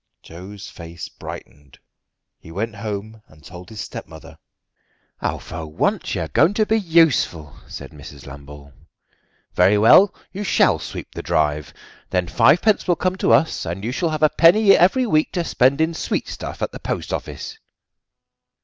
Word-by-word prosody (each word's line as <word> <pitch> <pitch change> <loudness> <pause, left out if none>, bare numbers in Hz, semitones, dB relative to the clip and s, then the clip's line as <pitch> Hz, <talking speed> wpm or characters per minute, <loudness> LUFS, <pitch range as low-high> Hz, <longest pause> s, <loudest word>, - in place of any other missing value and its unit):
Joe's 95 +5 -10
face 85 0 -9
brightened. 70 -2 -11 0.6
He 80 - -14
went 110 +5 -4
home 110 +1 -6
and 75 -1 -21
told 90 +5 -11
his 110 -2 -7
stepmother. 80 -1 -10 0.8
"For 80 0 -5
once 75 - -1
you - - -2
are - - -3
going 200 - +2
to 215 - +2
be 220 +1 +1
useful," 160 - +2
said - - -9
Mrs. 70 -2 -12
Lambole. 70 +1 -12 0.8
"Very 95 +4 +4
well, 145 - +6 0.2
you 200 +2 -5
shall - - +3
sweep - - -8
the - - -6
drive; 75 -1 -1 0.4
then 90 -1 0
fivepence 185 - +3
will 175 - +3
come 185 +1 -1
to - - +1
us, 160 - +2
and 85 +4 -5
you 120 - -2
shall 165 +6 -1
have 155 -1 -3
a 155 - +6
penny 195 +6 +5
every 250 +9 +3
week 155 -9 +1
to 175 - -1
spend 135 -2 +2
in 160 +1 +1
sweetstuff - - -4
at - - -2
the - - -9
post - - -4
office." 445 0 -6
105 Hz, 160 wpm, -21 LUFS, -, 0.8 s, well